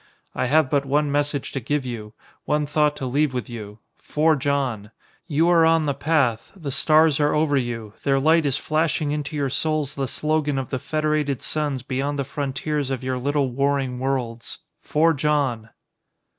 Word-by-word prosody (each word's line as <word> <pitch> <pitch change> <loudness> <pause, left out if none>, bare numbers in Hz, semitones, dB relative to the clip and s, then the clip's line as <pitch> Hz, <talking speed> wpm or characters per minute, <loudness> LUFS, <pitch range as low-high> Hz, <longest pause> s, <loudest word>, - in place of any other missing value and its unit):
I - - -1
have 155 +2 +4
but 140 -1 +2
one 145 +1 +1
message 145 -1 -1
to 135 - -3
give 140 +3 -2
you, 110 -4 -6 0.3
one 150 0 +1
thought 150 0 +1
to 135 - -5
leave 135 +1 +1
with 125 -4 -3
you 105 -3 -8 0.2
forge 150 -2 +1
on! 125 -7 -1 0.4
You 160 +1 +2
are 170 -2 +5
on 165 -1 +4
the 140 - +1
path, 135 -8 0
the 155 -7 -5
stars 155 +1 +4
are 150 0 +2
over 150 -1 +2
you, 115 -5 -2
their 135 -1 +2
light 160 +2 +3
is 135 - +1
flashing 155 -1 0
into 150 0 -3
your 140 -3 -1
souls 155 -1 -1
the 135 -3 -2
slogan 150 0 0
of 130 -2 -4
the 130 - -1
Federated 150 -1 -1
Suns 145 -5 -2
beyond 135 +3 -2
the 140 - 0
frontiers 140 +1 -3
of 130 -2 -3
your 130 0 -2
little 140 0 0
warring 135 -1 0
worlds. 125 -3 -3 0.2
Forge 155 -1 +1
on!" 135 -7 0
140 Hz, 180 wpm, -23 LUFS, 130-150 Hz, 0.4 s, are